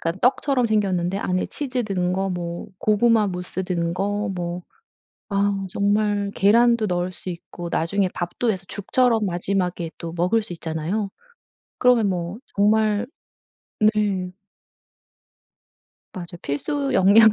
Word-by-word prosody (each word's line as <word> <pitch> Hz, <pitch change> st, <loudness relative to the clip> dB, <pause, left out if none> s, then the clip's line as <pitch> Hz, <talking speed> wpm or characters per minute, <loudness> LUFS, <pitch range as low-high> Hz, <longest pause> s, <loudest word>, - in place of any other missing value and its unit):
그러니까 165 Hz, +3 st, -2 dB
떡처럼 265 Hz, -3 st, 0 dB
생겼는데 195 Hz, -3 st, +1 dB
안에 185 Hz, -2 st, -1 dB
치즈 255 Hz, -4 st, -2 dB
든 180 Hz, -3 st, 0 dB
거, 190 Hz, +1 st, -1 dB
뭐 175 Hz, -1 st, -4 dB
고구마 215 Hz, 0 st, +3 dB
무스 180 Hz, 0 st, -4 dB
든 170 Hz, -2 st, -1 dB
거 205 Hz, +2 st, -1 dB
뭐 175 Hz, 0 st, -4 dB, 0.7 s
아 200 Hz, 0 st, +1 dB
정말 205 Hz, +1 st, +1 dB
계란도 235 Hz, +2 st, +4 dB
넣을 180 Hz, -1 st, -1 dB
수 185 Hz, -, -8 dB
있고 175 Hz, 0 st, -7 dB
나중에 185 Hz, +4 st, +1 dB
밥도 180 Hz, +7 st, -1 dB
해서 190 Hz, -3 st, -3 dB
죽처럼 225 Hz, +2 st, +1 dB
마지막에 180 Hz, -2 st, -1 dB
또 165 Hz, -1 st, -6 dB
먹을 185 Hz, +6 st, +2 dB
수 210 Hz, -, -7 dB
있잖아요. 165 Hz, +5 st, -2 dB, 0.7 s
그러면 240 Hz, -5 st, +4 dB
뭐 180 Hz, +2 st, -3 dB, 0.2 s
정말 215 Hz, +2 st, +3 dB, 0.8 s
네. 205 Hz, -4 st, +2 dB, 1.8 s
맞아요. 175 Hz, -1 st, -8 dB
필수 275 Hz, -, -2 dB
영양 215 Hz, +1 st, +7 dB
195 Hz, 255 characters per minute, -23 LUFS, 180-215 Hz, 1.8 s, 영양